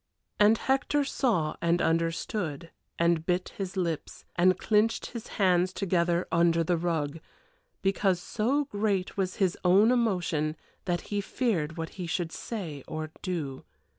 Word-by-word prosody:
And 210 Hz, +2 st, +6 dB
Hector 270 Hz, +3 st, +1 dB
saw 220 Hz, -, 0 dB
and 170 Hz, +1 st, +2 dB
understood, 165 Hz, 0 st, -1 dB, 0.3 s
and 170 Hz, -1 st, +2 dB
bit 180 Hz, +1 st, 0 dB
his 195 Hz, -1 st, -4 dB
lips, 170 Hz, -4 st, -3 dB
and 185 Hz, +1 st, +4 dB
clinched 220 Hz, +1 st, +2 dB
his 235 Hz, -3 st, -7 dB
hands 185 Hz, -2 st, +3 dB
together 175 Hz, -2 st, +1 dB
under 170 Hz, -1 st, +3 dB
the 175 Hz, +2 st, +1 dB
rug, 165 Hz, -3 st, -1 dB, 0.6 s
because 195 Hz, -1 st, +2 dB
so 255 Hz, +10 st, 0 dB
great 205 Hz, -6 st, -1 dB
was 185 Hz, -2 st, -1 dB
his 185 Hz, -3 st, +1 dB
own 195 Hz, +6 st, +6 dB
emotion 180 Hz, -10 st, +1 dB, 0.3 s
that 175 Hz, -2 st, 0 dB
he 205 Hz, -, +1 dB
feared 180 Hz, -, -1 dB
what 165 Hz, 0 st, -3 dB
he 175 Hz, -, -3 dB
should 165 Hz, 0 st, -2 dB
say 165 Hz, -, -5 dB
or 155 Hz, 0 st, -5 dB
do. 155 Hz, -8 st, -3 dB
180 Hz, 140 wpm, -28 LUFS, 165-205 Hz, 0.6 s, And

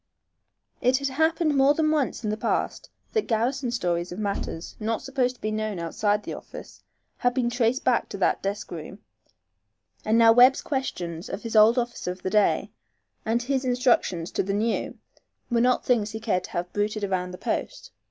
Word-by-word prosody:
It 255 Hz, +1 st, +3 dB
had 275 Hz, 0 st, -2 dB
happened 315 Hz, +2 st, +1 dB
more 275 Hz, +2 st, +5 dB
than 310 Hz, 0 st, +2 dB
once 290 Hz, -5 st, 0 dB
in 210 Hz, -, -1 dB
the -, -, -1 dB
past 220 Hz, -, -2 dB, 0.2 s
that 435 Hz, -, 0 dB
garrison 250 Hz, +3 st, 0 dB
stories 175 Hz, -7 st, -1 dB
of 180 Hz, -, -6 dB
matters 200 Hz, -5 st, -4 dB
not 225 Hz, 0 st, -2 dB
supposed 260 Hz, -2 st, 0 dB
to -, -, -26 dB
be 215 Hz, -, -2 dB
known 215 Hz, -2 st, -2 dB
outside 205 Hz, +5 st, 0 dB
the -, -, -5 dB
office -, -, -10 dB, 0.4 s
had 245 Hz, 0 st, +1 dB
been 240 Hz, -2 st, +1 dB
traced 240 Hz, +1 st, +1 dB
back 250 Hz, -2 st, +1 dB
to -, -, -6 dB
that 190 Hz, -, +1 dB
desk 200 Hz, +1 st, -4 dB
room, 170 Hz, +3 st, -7 dB, 1.1 s
and 220 Hz, +1 st, +2 dB
now 230 Hz, -1 st, +7 dB
Webb's 250 Hz, +3 st, +6 dB
questions 175 Hz, -, -4 dB
of 195 Hz, -, -5 dB
his 230 Hz, -1 st, -5 dB
old 220 Hz, +3 st, +6 dB
officer 240 Hz, -6 st, -2 dB
of 180 Hz, 0 st, -10 dB
the 185 Hz, -, -2 dB
day, 210 Hz, -1 st, +2 dB, 0.6 s
and 235 Hz, +2 st, +1 dB
his 265 Hz, +1 st, -1 dB
instructions 245 Hz, -9 st, +1 dB
to -, -, 0 dB
the 195 Hz, +1 st, -2 dB
new 220 Hz, +2 st, -1 dB, 0.5 s
were 235 Hz, -1 st, +3 dB
not 250 Hz, +1 st, +2 dB
things 225 Hz, -4 st, +2 dB
he 220 Hz, +1 st, -6 dB
cared 205 Hz, -5 st, -1 dB
to -, -, -11 dB
have 175 Hz, +1 st, -3 dB
bruited 210 Hz, +1 st, -1 dB
about 185 Hz, -2 st, -1 dB
the 180 Hz, -, -8 dB
post. -, -, -4 dB
225 Hz, 190 wpm, -25 LUFS, 200-255 Hz, 1.1 s, now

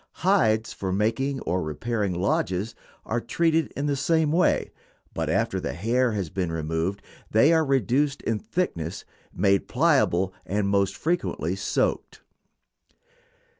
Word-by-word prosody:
Hides 110 Hz, -, +3 dB
for 95 Hz, -1 st, -4 dB
making 115 Hz, +7 st, 0 dB
or 90 Hz, +1 st, -1 dB
repairing 100 Hz, +5 st, -2 dB
lodges 95 Hz, +3 st, -1 dB, 0.3 s
are 120 Hz, +1 st, -1 dB
treated 160 Hz, +5 st, +1 dB
in 140 Hz, -, -1 dB
the 145 Hz, -1 st, +1 dB
same 160 Hz, +2 st, +1 dB
way, 175 Hz, +3 st, +2 dB, 0.4 s
but -, -, -2 dB
after -, -, 0 dB
the -, -, -4 dB
hair 115 Hz, -, +1 dB
has 95 Hz, -6 st, -3 dB
been 90 Hz, -3 st, -2 dB
removed 80 Hz, +4 st, -2 dB, 0.3 s
they 140 Hz, +10 st, +5 dB
are 160 Hz, -1 st, +4 dB
reduced 135 Hz, +1 st, +1 dB
in 115 Hz, -2 st, -1 dB
thickness, 85 Hz, -, -3 dB, 0.3 s
made 100 Hz, -1 st, +2 dB
pliable, 110 Hz, -, +2 dB
and 100 Hz, 0 st, -1 dB
most 100 Hz, -1 st, +1 dB
frequently 175 Hz, +2 st, -1 dB
soaked. -, -, -1 dB
110 Hz, 130 wpm, -25 LUFS, 95-140 Hz, 0.4 s, they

